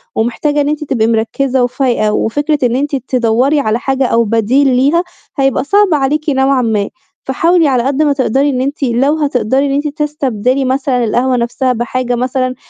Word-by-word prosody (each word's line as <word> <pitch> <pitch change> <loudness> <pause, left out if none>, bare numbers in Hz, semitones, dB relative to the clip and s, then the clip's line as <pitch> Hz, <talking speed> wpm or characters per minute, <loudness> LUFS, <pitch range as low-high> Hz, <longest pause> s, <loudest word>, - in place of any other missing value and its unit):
ومحتاجة 290 +6 0
إن 285 - 0
أنتِ 300 0 -2
تبقي 230 -6 0
مركّزة 245 +3 0
وفايقة، 245 -4 0
وفكرة 290 +8 0
إن 245 -1 +1
أنتِ 285 +2 -1
تدوَّري 255 +2 +1
على 220 -2 0
حاجة 270 0 -1
أو 235 -1 +2
بديل 230 +6 +1
ليها 290 +8 +2 0.3
هيبقى 270 -1 +1
صعب 400 +2 +2
عليكِ 295 +2 0
نوعًا 265 -1 +2
ما، 215 -4 -1 0.4
فحاولي 330 +4 +2
على 250 -3 +1
قد 275 +3 0
ما 290 -1 +2
تقدري 275 +1 +1
إن 255 -2 -1
أنتِ 280 +2 -3
لو 265 +5 +1
هتقدَري 270 -2 0
إن 275 - -1
أنتِ 290 +2 -1
تستبدلي 275 -4 -1
مثلًا 260 -1 0
القهوة 250 +3 +1
نفْسها 250 +2 -1
بحاجة 245 +1 -2
مثلًا، 255 +1 -1
265 Hz, 175 wpm, -13 LUFS, 245-285 Hz, 0.4 s, أو